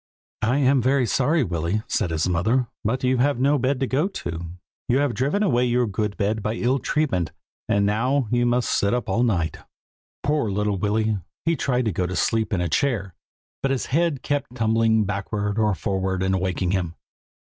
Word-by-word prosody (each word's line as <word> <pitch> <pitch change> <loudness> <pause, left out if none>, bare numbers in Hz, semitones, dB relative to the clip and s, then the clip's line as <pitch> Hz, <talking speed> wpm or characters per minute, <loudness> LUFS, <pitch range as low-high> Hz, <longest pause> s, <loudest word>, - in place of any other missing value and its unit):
'I 115 +5 +2
am 135 -1 +3
very 130 +1 +2
sorry, 140 +6 +2
Willy,' 85 +3 -1
said 105 - 0
his 80 +1 0
mother; 110 +9 +1 0.2
'but 120 +5 -1
you 130 0 +2
have 140 0 +2
no 140 +2 +3
bed 130 +1 0
to - - +3
go 140 +7 +1
to. 85 - -5 0.4
You 125 - +4
have 140 -3 +1
driven 145 - 0
away 125 -9 +2
your 125 0 +2
good 105 -1 -2
bed 105 +2 0
by 110 +2 -2
ill 125 +4 +1
treatment, 130 - 0 0.4
and 100 0 +3
now 125 +5 +1
you 120 0 +2
must 120 -2 +1
sit 100 +4 +2
up 125 - -3
all 115 - +1
night.' 90 -10 0 0.6
"Poor 145 -6 +1
little 100 0 -1
Willy! 105 +1 +1 0.3
he 165 0 +2
tried 125 -4 0
to 110 - +1
go 90 0 -1
to 95 - -4
sleep 110 +6 +1
in 95 -4 0
a 90 - 0
chair, 95 - 0 0.5
but 135 - 0
his 135 -2 0
head 165 -3 +1
kept 145 -4 -2
tumbling 110 -1 +2
backward 105 +1 -2
or 105 -2 +2
forward 95 -1 -1
and 95 0 +1
waking 90 -1 -1
him. 90 -3 -1
110 Hz, 195 wpm, -23 LUFS, 100-130 Hz, 0.6 s, You